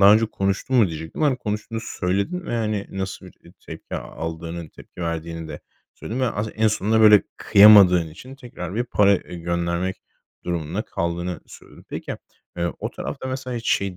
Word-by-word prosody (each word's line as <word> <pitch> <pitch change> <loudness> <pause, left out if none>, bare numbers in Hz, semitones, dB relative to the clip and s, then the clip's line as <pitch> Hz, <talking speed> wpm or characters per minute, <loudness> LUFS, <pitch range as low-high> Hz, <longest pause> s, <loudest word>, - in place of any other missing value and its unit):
daha 100 +1 +9
önce 110 +1 +3
konuştun 100 +5 -1
mu 115 -5 +6
diyecektim. 80 - -6
Hani, 140 -4 +3
konuştuğunu 110 0 -4
söyledin 100 - -2
ve, - - -2
hani, 105 -3 -1
nasıl 95 0 -5
bir, 90 - -13
eee, 85 - -16
tepki 80 0 -8
aldığının, 80 0 -6
tepki - - -14
verdiğini 85 0 -4
de - - -7 0.3
söyledin 120 +4 -5
ve 130 - +2
as 105 +1 -3
en 110 0 +3
sonunda, 110 +1 +1
böyle, 105 -2 +8
kıyamadığın 100 -5 +7
için 130 +11 -11
tekrar 105 -8 -8
bir 120 - 0
para, 100 -4 +4
eee, - - -11
göndermek 85 +2 -1 0.5
durumunda 85 +3 -2
kaldığını 85 -3 -3
söyledin. - - -15
Peki, - - -5 0.4
eee, 85 -1 -1
o - - -4
tarafta 130 - -6
mesela 130 -1 -4
hiç 115 - -2
şeyi 100 -2 0
100 Hz, 175 wpm, -23 LUFS, 85-110 Hz, 0.5 s, daha